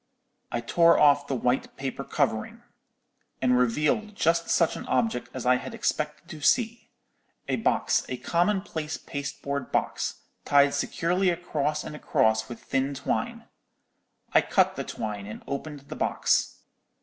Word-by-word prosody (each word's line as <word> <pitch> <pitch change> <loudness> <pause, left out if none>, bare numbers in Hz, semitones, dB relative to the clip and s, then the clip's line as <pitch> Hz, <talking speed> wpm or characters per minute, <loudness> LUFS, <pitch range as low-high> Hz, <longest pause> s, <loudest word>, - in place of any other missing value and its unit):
"I 120 - -1
tore 170 +8 +4
off 145 -1 +5
the 135 - -1
white 125 +1 -1
paper 135 -1 -4
covering, - - -1 0.8
and 125 -1 +3
revealed 150 - +1
just 165 -2 +1
such 170 - +3
an - - -7
object 125 -1 0
as 130 -2 -6
I 125 0 +5
had 130 - -7
expected 150 +2 -2
to 160 -3 -9
see—a 230 - -2
box, - - +1
a - - -3
common 185 +4 +1
place 160 -5 -4
pasteboard 140 -1 -5
box, - - -1 0.2
tied 140 0 +4
securely 175 +6 +1
across 155 -4 -1
and 150 - -7
across 110 -8 +1
with 120 - -9
thin 135 +1 -1
twine. - - -2 0.9
I - - +7
cut - - +2
the - - -3
twine 105 -2 -5
and 105 - -8
opened 145 +1 -5
the 140 - -9
box. - - +1
145 Hz, 145 wpm, -27 LUFS, 125-165 Hz, 0.9 s, I